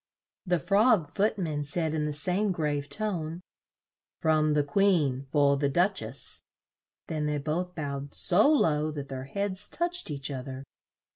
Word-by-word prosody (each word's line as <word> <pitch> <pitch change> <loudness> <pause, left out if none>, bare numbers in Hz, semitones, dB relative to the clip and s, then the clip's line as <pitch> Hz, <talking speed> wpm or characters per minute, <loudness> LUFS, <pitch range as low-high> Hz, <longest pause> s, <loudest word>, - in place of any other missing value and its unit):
The 180 0 +3
Frog 200 - +3
Foot 210 +2 +1
man 155 -6 -2
said 160 +2 -1
in 155 -1 0
the 150 - -1
same 185 +7 0
grave 150 -4 -2
tone, 175 -7 -3 0.8
"From 155 -1 +2
the 150 - +3
Queen, 145 -5 +1
for 140 -1 +3
the 140 0 +1
Duch 180 +7 +2
ess." - - +1 0.6
Then 155 -2 -2
they 150 0 0
both 165 +5 -3
bowed 140 -2 -5
so 210 - +4
low 155 - +2
that 145 -2 -6
their 130 -1 -5
heads 200 +6 -2
touched 345 - -1
each 140 -1 -4
oth 130 0 -5
er. 130 0 -6
155 Hz, 160 wpm, -28 LUFS, 145-190 Hz, 0.8 s, so